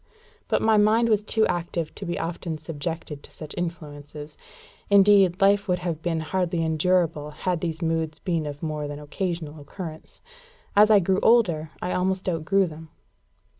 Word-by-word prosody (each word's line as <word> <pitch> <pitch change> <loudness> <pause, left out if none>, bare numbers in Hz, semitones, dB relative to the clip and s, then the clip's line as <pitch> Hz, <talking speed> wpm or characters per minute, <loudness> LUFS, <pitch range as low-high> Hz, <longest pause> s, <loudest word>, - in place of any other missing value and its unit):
But - - +1
my 220 -1 +4
mind 220 +3 +4
was 210 -2 +2
too 220 +1 +2
active 170 -2 -2
to 195 - -7
be 175 - -2
often 165 -1 -4
subjected 155 -1 -5
to - - -14
such 155 -2 -9
influences. 150 -3 -6 0.5
Indeed 200 -2 +5
life 200 0 +3
would 180 -1 +1
have 170 -3 -4
been 165 -2 -1
hardly 170 0 -1
endurable 160 -1 +1
had 165 +3 -2
these 165 -1 -3
moods 160 -1 -1
been 165 -5 -2
of 145 +1 -7
more 155 -2 -3
than 145 0 -6
occasional 155 0 -4
occurrence. 160 +1 -9 0.6
As 210 +1 +7
I 210 -2 +6
grew 190 +2 +1
older, 175 -10 +3
I 180 - -2
almost 190 +1 -1
outgrew 185 +3 +2
them. 160 -1 -9
170 Hz, 165 wpm, -25 LUFS, 155-190 Hz, 0.6 s, As